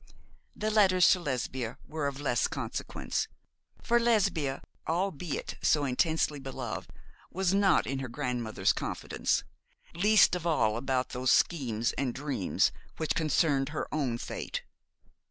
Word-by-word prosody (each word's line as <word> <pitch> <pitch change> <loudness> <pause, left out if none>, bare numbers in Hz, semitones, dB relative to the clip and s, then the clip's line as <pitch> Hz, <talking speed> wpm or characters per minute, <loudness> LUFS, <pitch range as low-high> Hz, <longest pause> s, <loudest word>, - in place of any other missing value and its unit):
The 215 +1 -1
letters 190 -4 +5
to 185 - +3
Lesbia 130 -5 -3
were 150 -2 -2
of 140 -1 -4
less 140 -5 +1
consequence; - - -3 0.6
for 240 +1 +3
Lesbia, 190 - +1 0.2
albeit 175 -2 -2
so 150 -2 +3
intensely 150 +3 +1
beloved, 130 -3 -5 0.4
was 190 0 0
not 195 -2 +4
in 135 0 -2
her 135 - -4
grandmother's 120 -3 -1
confidence, - - -1 0.5
least 205 +5 +5
of 175 -1 -1
all 110 -10 +2
about 130 +1 -1
those 125 0 0
schemes 120 -9 +2
and 130 -3 -1
dreams 135 -8 0 0.3
which 160 - 0
concerned 150 -3 +2
her 150 - -3
own 135 -6 0
fate. - - -5
145 Hz, 130 wpm, -30 LUFS, 130-175 Hz, 0.6 s, letters